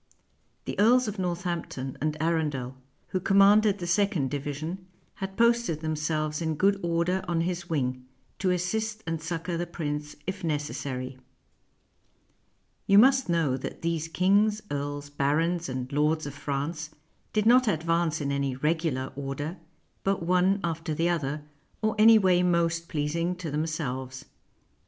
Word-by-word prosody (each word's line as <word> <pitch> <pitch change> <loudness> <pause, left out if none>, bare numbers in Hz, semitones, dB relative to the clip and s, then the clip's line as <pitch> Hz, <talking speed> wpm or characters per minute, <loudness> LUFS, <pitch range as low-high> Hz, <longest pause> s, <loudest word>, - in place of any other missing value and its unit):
The - - -4
earls 245 +3 +5
of 210 -1 -4
Northampton 170 -7 -3
and 155 0 -1
Arundel, 150 -6 -1 0.3
who 185 - -1
commanded 200 +2 +5
the 180 - -5
second 175 -6 +1
division, 150 +6 -4 0.3
had 195 0 -5
posted 235 -9 +2
themselves 155 0 -1
in 160 -1 -1
good 195 +5 +2
order 170 +2 0
on 170 -1 +1
his 175 0 -3
wing, 130 -5 -1 0.3
to 190 - +1
assist 215 +5 -1
and 165 -1 -3
succor 170 +1 -3
the 175 +1 -2
prince 150 -3 -4
if 190 0 -4
necessary. 140 -4 -3 1.7
You 200 - +6
must 260 +1 +6
know 165 -6 +2
that 135 - -7
these 165 -1 -1
kings, 205 +5 +2
earls, 145 0 -4
barons, 160 +4 0
and 130 0 -4
lords 150 +2 +1
of 145 - -5
France 145 +3 -3 0.4
did 215 -1 +1
not 250 +2 +6
advance 165 -3 +1
in 140 -1 -1
any 140 -2 -1
regular 150 -2 -1
order, 140 +5 -4 0.5
but 195 -3 0
one 180 +3 +3
after 165 -1 -2
the 165 +3 +1
other, 150 -3 -1 0.4
or 215 - +2
any 225 +1 +8
way 185 -3 +4
most 170 -1 +1
pleasing 165 +4 -1
to 175 -4 -6
them 155 +2 -1
selves. 130 -4 -4
165 Hz, 145 wpm, -27 LUFS, 150-185 Hz, 1.7 s, any